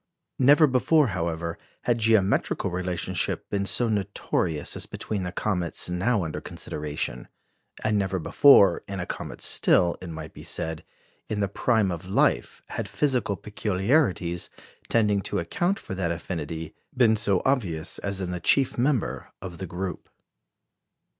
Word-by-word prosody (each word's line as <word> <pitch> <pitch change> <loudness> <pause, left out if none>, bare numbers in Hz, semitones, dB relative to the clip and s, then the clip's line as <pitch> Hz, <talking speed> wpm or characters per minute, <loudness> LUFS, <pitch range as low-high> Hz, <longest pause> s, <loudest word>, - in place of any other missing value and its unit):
Never 145 +4 +7
before, 140 +1 +3
however, 85 -2 -3 0.2
had 120 -1 +1
geometrical 110 -6 +2
relationship 90 0 -2
been 100 -1 0
so 120 +5 +2
notorious 95 -6 -1
as - - -4
between 105 -3 -4
the 90 -1 -3
comets 90 -3 -2
now 100 +3 +1
under 80 - -4
consideration; 75 -4 -4 0.6
and 110 -1 +2
never 95 -1 -1
before, 100 - +6
in 95 -1 -5
a 90 - -2
comet - - -6
still, 85 -2 +3
it 90 - -7
might 80 -1 -7
be - - -11
said, 80 -1 -4 0.5
in 105 - -2
the 100 - +1
prime 105 0 +1
of 85 +2 -6
life, - - +1
had 100 - -4
physical 125 -1 0
peculiarities 95 - 0 0.4
tending 105 -3 +2
to - - -3
account 175 - 0
for - - -7
that 95 -3 -1
affinity 80 -2 -5 0.2
been 115 -3 +5
so 100 -3 +1
obvious 95 - 0
as 100 -1 -3
in 90 -1 -3
the 90 - -3
chief 130 +8 +3
member 130 -3 0
of 90 -3 -8
the 95 - -4
group. 90 +2 -5
95 Hz, 145 wpm, -26 LUFS, 85-110 Hz, 0.6 s, Never